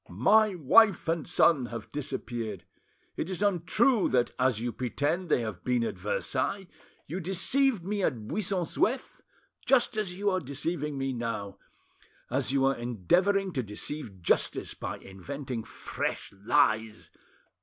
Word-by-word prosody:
My 205 - +4
wife 180 - +5
and 165 -2 -1
son 140 -7 +3
have 115 -2 -7
disappeared. 120 - -4 0.5
It 165 - -2
is 190 +1 -2
untrue 205 +5 +2
that, 125 -1 +2
as 125 -3 +2
you 120 +1 -2
pretend, 145 +9 -2
they 125 - +3
have 110 -6 -5
been 125 -2 +1
at - - -3
Versailles. 205 - -1 0.4
You 175 +6 -4
deceived 195 +4 +1
me 205 +1 -1
at 115 - -1
Buisson 190 - -1
Souef, 245 +10 -1 0.4
just 245 -4 +3
as 190 -4 -2
you 200 0 +1
are 185 - +1
deceiving 145 0 -3
me 135 0 -1
now, 115 -5 -4 0.7
as 130 +1 +1
you 135 -1 +2
are 135 0 +3
endeavouring 180 - +1
to 130 - 0
deceive 105 - -6
justice - - +1
by - - -5
inventing 125 +5 -6
fresh - - -4
lies. 110 +2 +1
145 Hz, 145 wpm, -29 LUFS, 120-190 Hz, 0.7 s, wife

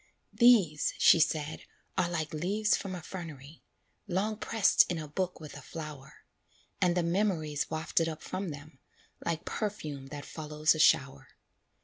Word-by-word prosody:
"These," 210 -12 +4
she 170 - +6
said, 155 -1 0 0.3
"are 180 -2 +1
like 160 -3 -3
leaves 200 +7 +1
from 195 -2 -5
a 175 - -8
fernery, 155 -5 -9 0.5
Long 205 +4 -1
pressed 225 -1 +4
in 175 - -1
a 155 -1 -5
book 180 +4 -3
with 155 -3 -10
a 145 - -9
flower; 150 -1 -9 0.6
And 180 -1 +3
the 175 - +2
memories 170 -5 0
wafted 160 +1 0
up 155 - -7
from 190 -1 -4
them, 145 -1 -10 0.4
Like 165 -1 -2
perfume 155 -11 -4
that 145 +1 -8
follows 155 -1 0
a 155 - -5
shower. 140 -2 +3
160 Hz, 150 wpm, -30 LUFS, 150-185 Hz, 0.6 s, she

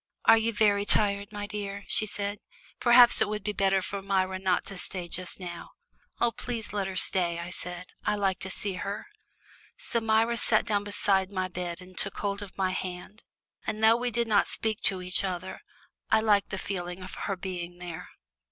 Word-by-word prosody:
"Are 225 - +9
you 225 +1 +1
very 205 -2 +3
tired, 200 0 +2
my 205 -1 -4
dear?" 200 -1 -5
she 215 - +2
said. 205 0 -3 0.4
"Perhaps 240 -1 +7
it 220 - +4
would 210 -1 -3
be 210 - -1
better 195 -1 +2
for 200 +1 -4
Myra 190 -1 0
not 185 -1 +1
to 195 - -6
stay 180 -1 -3
just 180 +2 -4
now." 175 -2 -7 0.5
"Oh, 240 - +3
please 235 -2 -5
let 200 -2 -1
her 190 - -5
stay," 175 -2 +1
I 170 +1 -5
said; 180 0 -6 0.2
"I - - +1
like 195 -3 0
to 190 - -4
see 200 +1 0
her." 200 +2 -4 0.7
So 235 - -2
Myra 225 +1 +3
sat 225 -2 +2
down 205 -3 +1
beside 195 -2 +1
my 185 -2 -1
bed 180 -1 -5
and 185 0 -14
took 200 - -1
hold 200 0 -2
of 200 -1 -9
my 190 -1 +1
hand, 185 +3 -6 0.4
and 220 0 -2
though 225 +1 +7
we 245 +1 -1
did 235 0 0
not 210 -2 +4
speak 220 +1 -1
to 190 -4 +1
each 180 +2 +1
other, 185 -1 -4 0.5
I 220 - +5
liked 210 -2 +3
the 190 - -3
feeling 180 -1 -4
of 185 - -9
her 200 - -3
being 180 -2 -5
there. 175 -2 -7
Mrs. - - -24
200 Hz, 205 wpm, -28 LUFS, 185-215 Hz, 0.7 s, Are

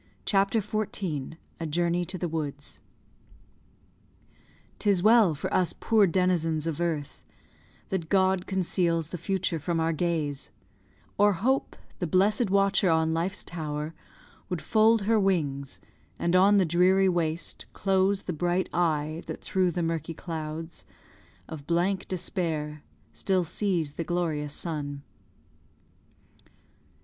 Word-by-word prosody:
CHAPTER 200 +2 +2
XIV 190 -9 -3 0.2
A 165 - -3
JOURNEY 170 +2 0
TO 185 +2 -4
THE 175 - -2
WOODS 150 -3 -5 2.0
'Tis 200 -4 +2
well 215 -6 +6
for - - -4
us 185 -2 +1
poor 220 -3 +4
denizens 165 -3 +1
of 165 0 -3
earth 160 -4 -3 0.7
That 170 -4 -3
God 190 -1 +2
conceals 170 -4 0
the 180 - -5
future 185 -2 -1
from 165 +2 -1
our 165 0 +1
gaze; 155 -4 -2 0.7
Or 205 0 +5
Hope, 255 +9 0 0.2
the 175 - -1
blessed 200 +6 +2
watcher 195 0 +3
on 160 0 +2
Life's 180 +5 -1
tower, 155 -2 -4 0.6
Would 180 - -2
fold 220 0 +4
her 220 +2 +3
wings, 145 -9 -1 0.4
and 170 +1 0
on 200 +3 +6
the 190 - +4
dreary 185 +3 +4
waste 170 -2 -1
Close 195 0 +1
the 180 - -3
bright 175 +3 0
eye 155 -2 0
that - - -5
through 185 -1 +1
the 175 0 -2
murky 165 0 -2
clouds 160 0 -6 0.6
Of 150 -3 -9
blank 180 +3 0
Despair 165 -5 -3 0.3
still 190 -2 +1
sees 170 -4 -1
the 165 - -3
glorious 160 -4 -2
sun. 145 -4 -4
175 Hz, 125 wpm, -27 LUFS, 160-190 Hz, 2.0 s, well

